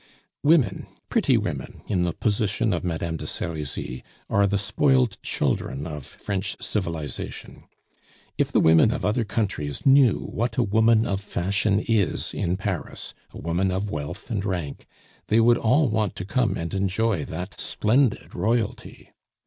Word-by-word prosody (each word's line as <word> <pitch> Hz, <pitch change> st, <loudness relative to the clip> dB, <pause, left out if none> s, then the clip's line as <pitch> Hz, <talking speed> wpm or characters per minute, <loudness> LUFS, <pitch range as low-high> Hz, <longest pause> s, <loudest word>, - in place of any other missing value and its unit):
Women, 145 Hz, -, +3 dB, 0.2 s
pretty -, -, +3 dB
women, -, -, -4 dB
in 90 Hz, -4 st, 0 dB
the 85 Hz, -, -1 dB
position 105 Hz, +1 st, 0 dB
of 85 Hz, -, -2 dB
Madame 85 Hz, -1 st, -2 dB
de -, -, -6 dB
Serizy, 75 Hz, -5 st, -4 dB, 0.3 s
are 100 Hz, 0 st, +4 dB
the 100 Hz, +1 st, +1 dB
spoiled 125 Hz, +2 st, +2 dB
children 70 Hz, +1 st, -1 dB
of 75 Hz, -5 st, -6 dB
French 100 Hz, -1 st, -4 dB
civilization. 85 Hz, -, -4 dB, 0.7 s
If -, -, 0 dB
the -, -, +4 dB
women 80 Hz, +5 st, +6 dB
of -, -, -2 dB
other 115 Hz, +3 st, +1 dB
countries 100 Hz, -, -2 dB
knew 135 Hz, -5 st, +6 dB, 0.2 s
what 120 Hz, +2 st, -1 dB
a 125 Hz, -, +4 dB
woman 110 Hz, +1 st, +4 dB
of 100 Hz, -2 st, -1 dB
fashion 100 Hz, +2 st, 0 dB
is 110 Hz, -5 st, +1 dB
in 90 Hz, +1 st, -1 dB
Paris, 95 Hz, -3 st, -4 dB, 0.2 s
a -, -, -12 dB
woman 85 Hz, +3 st, 0 dB
of 95 Hz, +2 st, -2 dB
wealth 75 Hz, +10 st, -5 dB
and 105 Hz, -4 st, -1 dB
rank, 90 Hz, -8 st, -4 dB, 0.4 s
they 110 Hz, -, +4 dB
would 120 Hz, +1 st, +5 dB
all 135 Hz, +6 st, +3 dB
want 110 Hz, -4 st, 0 dB
to 90 Hz, -, -5 dB
come 115 Hz, +3 st, +1 dB
and 85 Hz, +2 st, -4 dB
enjoy 95 Hz, -1 st, 0 dB
that 90 Hz, +3 st, -6 dB
splendid 120 Hz, +2 st, +1 dB
royalty. 110 Hz, +4 st, -2 dB
100 Hz, 150 wpm, -25 LUFS, 85-110 Hz, 0.7 s, women